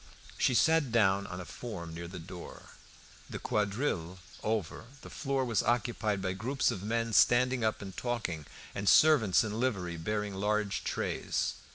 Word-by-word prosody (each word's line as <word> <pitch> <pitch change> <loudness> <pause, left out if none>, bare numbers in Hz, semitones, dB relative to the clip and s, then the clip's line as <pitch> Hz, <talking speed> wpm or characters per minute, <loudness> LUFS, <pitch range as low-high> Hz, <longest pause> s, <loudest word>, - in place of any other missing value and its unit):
She 125 - +3
sat 160 -2 +3
down 100 -3 +3
on 90 - -6
a 90 - -6
form 85 -3 -7
near 85 +1 -6
the 90 +2 -8
door. 90 +1 -10 0.6
The - - -5
quadrille 100 - -1 0.2
over, 110 -2 -2 0.2
the - - -10
floor 135 -2 -1
was 115 -4 +1
occupied 110 -4 0
by 95 -1 -1
groups 125 +8 0
of 95 - -5
men 115 +2 -1
standing 125 +2 +4
up 110 -1 0
and 95 -2 -8
talking 100 - -3 0.3
and 100 0 0
servants 135 - +6
in 110 0 -3
livery 95 -9 -1
bearing 105 +4 -2
large 105 +1 -1
trays. - - -1
105 Hz, 160 wpm, -31 LUFS, 95-120 Hz, 0.6 s, servants